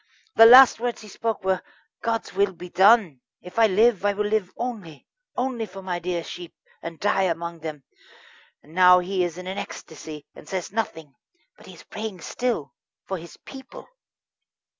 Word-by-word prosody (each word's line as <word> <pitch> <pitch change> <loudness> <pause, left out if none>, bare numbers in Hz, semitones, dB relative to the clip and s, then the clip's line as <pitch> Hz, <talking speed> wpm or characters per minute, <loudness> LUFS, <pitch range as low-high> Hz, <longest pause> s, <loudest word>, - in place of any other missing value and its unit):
The 225 - +9
last 255 0 +9
words 240 0 -3
he 215 - -12
spoke 225 +1 -3
were: 190 -1 0 0.4
'God's 225 -1 -2
will 200 0 +1
be 180 0 -10
done. 190 - +4 0.2
If 180 +5 -7
I 225 - +6
live, 215 +1 +3
I 205 0 +2
will 210 +1 -2
live 205 -3 -1
only 205 - -6 0.3
only 245 -3 -2
for 195 0 -11
my 180 -2 -3
dear 175 -1 -3
sheep, 175 0 -9 0.3
and 165 -1 -8
die 195 -1 +1
among 170 0 -4
them'; 155 -3 -7 0.8
and 155 - -18
now 180 0 +7
he 180 +1 -1
is 175 -1 -3
in 180 - -8
an 190 +1 -4
ecstasy, 155 -2 -9
and 150 - -14
says 185 -2 -4
nothing. 160 -9 -4 0.4
But - - -18
he - - -12
is - - -15
praying 210 -5 -7
still 165 - -3 0.3
for 190 -2 -4
his 170 +1 -12
people." 265 -2 -12
190 Hz, 180 wpm, -24 LUFS, 170-220 Hz, 0.8 s, The